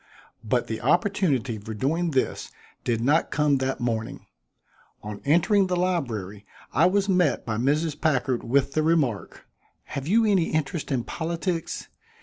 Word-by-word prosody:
But - - 0
the - - -5
opportunity 150 - +1
for 110 +1 -7
doing 160 +9 0
this 135 -4 -1 0.3
did 115 -2 0
not 145 +7 +2
come 150 -2 +2
that 130 0 -2
morning. 115 -2 -3 0.8
On 105 -1 -7
entering 180 +6 +3
the 180 - 0
library 120 - -2 0.3
I 165 - +5
was 200 +1 +1
met 180 -8 +2
by 110 -2 -2
Mrs. 150 +5 0
Packard 130 -5 +1
with 140 +3 +1
the 155 - +2
remark: 155 -10 0 0.4
"Have 140 +1 -6
you 225 +5 +4
any 195 -6 +2
interest 155 0 -2
in 125 -3 0
politics? 170 +2 -3
150 Hz, 145 wpm, -25 LUFS, 120-175 Hz, 0.8 s, I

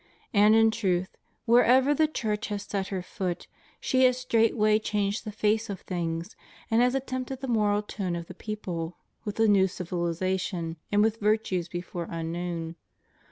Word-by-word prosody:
And 210 +1 +6
in 225 0 +5
truth, 190 -5 -1 0.3
wherever 250 +4 +5
the 310 +2 +3
Church 215 -8 -2
has 205 -1 -3
set 195 -2 -3
her 190 -2 -3
foot, 180 -1 -4 0.3
she 260 0 +3
has 250 -1 +4
straightway 225 -3 +3
changed 210 0 -1
the 215 - -4
face 215 +1 0
of 195 -3 -5
things, 170 +1 -3 0.4
and 225 +1 +4
has 250 +1 +3
attempered 260 0 -3
the 270 - -4
moral 210 -3 +2
tone 190 -4 -3
of 170 -1 -5
the 185 - -10
people 180 -5 -5 0.3
with 210 0 -5
a 225 - +5
new 195 -2 +5
civilization, 175 -1 -2
and 205 0 +4
with 220 0 +1
virtues 210 -4 +1
before 175 -1 -5
unknown. 165 0 -4
205 Hz, 160 wpm, -27 LUFS, 180-225 Hz, 0.4 s, And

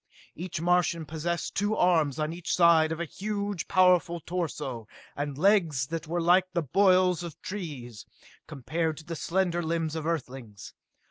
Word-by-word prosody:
Each 175 0 -5
Martian 170 -1 +1
possessed 165 +2 -3
two 205 +2 0
arms 160 -8 +2
on 155 +1 -2
each 175 0 -2
side 165 -2 +5
of 160 - -3
a 170 - -2
huge, 205 +1 -4
powerful 180 -2 +3
torso, 150 -10 -4 0.3
and 145 -1 -4
legs 165 -7 +3
that 165 +2 -5
were 175 +2 -1
like 180 +2 +3
the 170 -1 0
bolls 185 +2 +3
of 170 -4 -8
trees, 140 - -7 0.4
compared 155 +3 -2
to 160 - -10
the 165 0 -5
slender 175 +1 0
limbs 165 -1 -2
of 160 -1 -3
Earthlings. 130 -9 -5
170 Hz, 155 wpm, -28 LUFS, 155-180 Hz, 0.4 s, side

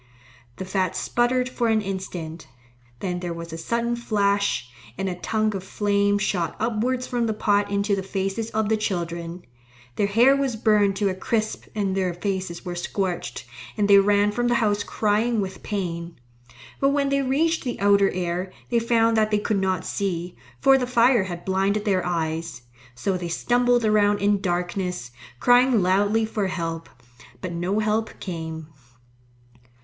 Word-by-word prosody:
The 190 - -6
fat 185 0 -1
sputtered 245 +5 +1
for 245 -2 -1
an 220 -1 +3
instant; 180 -6 -5 0.5
then 180 -2 -2
there 175 -1 -4
was 170 -1 -7
a - - -3
sudden 235 +7 -1
flash, 200 - 0 0.3
and 195 - -2
a 185 - -1
tongue 215 +3 -1
of 190 - -4
flame 205 0 +1
shot 180 -5 -1
upwards 240 +3 0
from 240 -2 -1
the 220 - -1
pot 205 -1 +1
into 200 0 +1
the 195 - -2
faces 195 +3 -3
of 220 -1 0
the 220 +1 +2
children. 170 -3 -4 0.5
Their 200 - +2
hair 240 +7 +5
was 275 -4 0
burned 210 -3 +3
to 200 0 +1
a - - -1
crisp 215 +3 -2
and 195 -3 0
their 185 -3 0
faces 185 -1 -3
were 180 - -3
scorched, 175 -5 -3 0.3
and 205 -1 +2
they 200 -1 +8
ran 205 +1 +3
from 240 +3 0
the 240 - +2
house 210 -3 +1
crying 220 +3 +1
with 190 -1 -4
pain. 170 -5 -4 0.6
But 275 - +3
when 280 0 +1
they 275 0 +2
reached 310 +5 +1
the 245 -3 -4
outer 200 -1 +4
air, 180 +1 -3 0.2
they 235 - +3
found 230 -1 +2
that 215 -1 +3
they 210 - +2
could 205 -1 0
not 185 -2 0
see, 180 -3 -3 0.2
for 270 - +5
the 250 - -1
fire 240 -3 +4
had 175 -2 -7
blinded 195 +2 0
their 190 -3 +2
eyes. 160 -5 -3 0.3
So 185 +10 -1
they 175 -1 -4
stumbled 245 +6 +2
around 205 -1 +3
in 200 0 +1
darkness, 180 -6 -2 0.3
crying 245 - +4
loudly 205 +4 +2
for 215 -2 -2
help. 165 -3 -4 0.5
But 185 - -5
no 175 +4 -1
help 215 +1 -1
came. 160 -3 -5
200 Hz, 170 wpm, -24 LUFS, 180-220 Hz, 0.6 s, they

